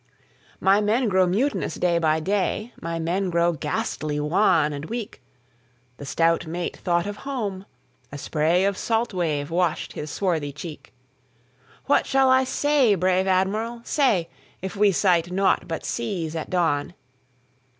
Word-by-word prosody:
'""My 195 +2 +4
men 220 +3 +1
grow 190 -1 +3
mutinous 240 +11 0
day 175 -1 +1
by 160 -1 +2
day; 205 +6 -1
My 165 0 -3
men 180 +4 -1
grow 170 0 +2
ghastly 150 0 -3
wan 155 -1 +2
and 145 +1 -6
weak."The 125 - -11
stout 165 +2 +1
mate 170 +2 -4
thought 175 0 0
of 205 0 -5
home; 205 -9 -4 0.4
a - - -7
sprayOf 170 +7 +1
salt 230 +2 -1
wave 155 -5 -1
washed 175 -1 0
his 150 - -6
swarthy 160 -6 -1
cheek."What 130 - -6
shall 265 -1 +3
I 260 0 +4
say, 275 -5 +2
brave 185 +1 +1
Admiral, 210 +5 0
say, 235 - +1 0.3
If 190 0 -6
we 205 0 +4
sight 175 -2 +2
naught 195 +1 +1
but 165 -1 -4
seas 160 +5 -3
at 160 - -4
dawn?" 165 -2 0
175 Hz, 140 wpm, -24 LUFS, 155-200 Hz, 0.4 s, My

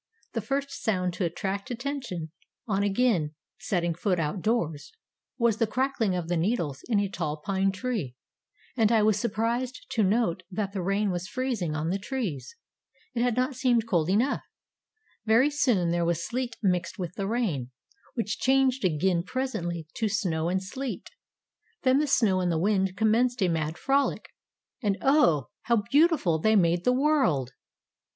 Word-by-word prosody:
The - - -1
first 280 0 -2
sound 180 -4 0
to 180 - -1
attract 195 +4 -3
attention, 245 - -4 0.4
on 200 -2 +1
again 200 -7 +1 0.2
setting 175 -5 0
foot 180 +1 0
out 160 +4 -2
doors, 170 -10 -1 0.5
was 235 -4 +2
the 230 - +2
crackling 240 -4 0
of 175 -2 -3
the 175 0 0
needles 165 - -1
in 215 -4 +3
a 200 - +1
tall 160 -5 -3
pine 195 +4 0
tree, 200 - -3 0.6
and 225 -3 +3
I 220 -2 +4
was 215 -1 +3
surprised 235 +5 -2
to 235 -4 +1
note 200 -3 +1
that 195 +1 -3
the 195 - -2
rain 195 +2 +1
was 175 +1 -3
freezing 220 -10 -2
on 155 +2 -1
the 195 - -1
trees. 220 - -4 0.6
It 235 - -1
had 245 -2 +2
not 255 +2 +1
seemed 245 -3 +1
cold 175 -6 +1
enough. 230 +9 +2 0.9
Very 245 +7 +5
soon 230 -12 +2
there 170 0 +1
was 170 0 0
sleet 245 -1 -3
mixed 180 0 0
with 175 -3 -4
the 195 +1 -3
rain, 195 - -1 0.5
which 225 -4 -2
changed 265 -1 +2
again 175 +1 +2
presently 175 -7 -3
to 220 -2 0
snow 170 -6 0
and 190 +1 0
sleet. 260 +7 -5 0.7
Then 260 +1 +4
the 300 - +1
snow 215 -8 +3
and 180 -1 +1
the 165 - +1
wind 190 +1 +1
commenced 230 +2 +2
a 180 - +3
mad 160 -1 -1
frolic, 275 +1 0 0.5
and 200 -4 0
Oh! 265 - +3 0.2
how 235 -3 +2
beautiful 290 - +4
they 220 +6 +3
made 175 -2 +3
the 250 - +5
world! 255 - +2
205 Hz, 165 wpm, -27 LUFS, 175-245 Hz, 0.9 s, Very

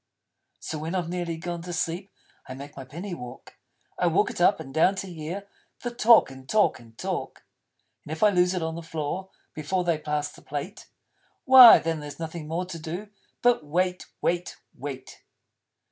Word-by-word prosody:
So 155 - -5
when 160 +4 -4
I've 175 -3 -1
nearly 175 -2 -3
gone 170 +1 -5
to 175 +1 -7
sleep, 175 +3 -3 0.4
I 130 - -6
make 140 +2 -10
my 135 - -7
Penny 170 +9 -7
walk. 125 -7 -10 0.4
I - - +3
walk - - +2
it - - -6
up - - +4
and 135 - -9
down, 180 +6 +4
to 190 -2 -6
hear 170 +5 -6 0.4
The 240 - -2
talk 230 - +6
and 130 0 -13
talk 215 -1 +3
and 115 -2 -18
talk. - - -4 0.6
And - - -10
if 160 - -2
I 210 - +7
lose 180 0 +2
it 180 - -2
on 160 0 -2
the 170 - -6
floor 165 +3 -4 0.2
Before 170 +4 -1
they 170 -3 0
pass 150 -1 -2
the - - -16
Plate, 150 +8 -6 0.6
Why 260 -3 +11
then 165 -1 -2
there's 145 -1 -8
nothing 165 -1 -6
more 170 +3 -2
to 175 -2 -7
do 175 +7 -6 0.3
But 245 -8 +4
wait 180 +4 -1 0.2
wait 175 +1 -1 0.2
wait. 135 -1 -8
165 Hz, 190 wpm, -26 LUFS, 150-185 Hz, 0.6 s, Why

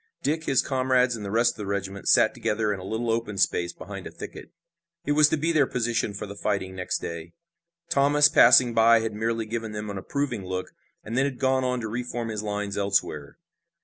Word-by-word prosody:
Dick, 160 +2 -1
his 135 -2 +2
comrades 130 -2 +1
and 110 - -7
the 100 - -5
rest 115 +3 +3
of - - -21
the 105 - -5
regiment 100 -1 -4
sat - - +5
together 105 -1 -1
in 100 - -6
a - - -9
little 110 +4 -2
open 115 -3 -2
space 85 -2 +1
behind - - -9
a - - -10
thicket. - - -10 0.6
It 145 - 0
was 150 0 +5
to 160 - +1
be 160 +3 0
their 150 -5 +3
position 115 -4 -1
for 100 - -5
the 100 0 -9
fighting 100 -2 -2
next 90 -1 -2
day. 85 0 -7 0.5
Thomas, 145 +1 +4
passing 125 -3 +6
by, 115 0 +5
had 110 -1 -3
merely 115 +1 -2
given 110 0 -5
them 105 0 -5
an 100 - -5
approving 140 -2 -3
look, 95 0 -5 0.3
and 115 - -6
then 135 +2 +2
had 135 -3 -3
gone 130 0 +1
on 125 -1 -1
to 110 - -4
re 115 +3 -3
form 120 -2 -5
his 105 -2 -3
lines 105 -1 -3
elsewhere. 100 -7 -1
115 Hz, 220 wpm, -25 LUFS, 100-130 Hz, 0.6 s, passing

